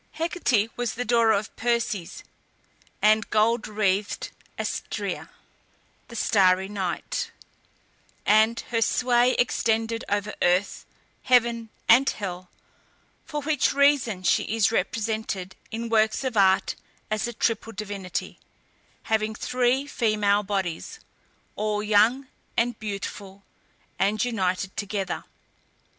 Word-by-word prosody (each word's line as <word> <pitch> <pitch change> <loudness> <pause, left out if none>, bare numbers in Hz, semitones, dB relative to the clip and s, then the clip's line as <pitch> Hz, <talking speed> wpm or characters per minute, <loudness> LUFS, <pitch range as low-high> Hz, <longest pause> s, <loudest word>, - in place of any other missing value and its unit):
Hecate 280 - 0
was 245 -2 -2
the 245 - -3
daughter 230 -1 +4
of 215 0 -1
Perses 230 -6 -2 0.8
and 215 0 +4
"gold 220 +2 +2
wreathed" 205 -1 -1 0.3
Astræa - - -4 0.8
(the 235 - -11
starry 190 -4 +3
night), 200 - -3 1.0
and 220 +2 +4
her 230 -1 +1
sway 245 +1 +3
extended 225 -1 0
over 205 +1 -1
earth, 180 +3 +1 0.3
heaven, 235 -2 +2 0.2
and 255 +4 +6
hell, 185 -3 -5 0.8
for 295 -1 -4
which 295 -2 +1
reason 280 -9 +3
she 175 - +3
is 220 -1 +2
represented 215 -3 -2
in 230 +1 -4
works 220 +1 +2
of 260 -3 -2
art 190 -2 +4 0.4
as 215 +1 0
a 240 - -5
triple 225 0 -1
divinity, 195 -3 -5 0.6
having 220 0 0
three 250 +4 +1
female 210 -6 +1
bodies, 195 - -3 0.6
all 210 0 -1
young 220 +6 +3 0.3
and 235 0 +1
beautiful, 200 -1 -6 0.6
and 210 +4 +2
united 190 -4 -1
together. 200 -3 -3
220 Hz, 110 wpm, -25 LUFS, 200-235 Hz, 1.0 s, and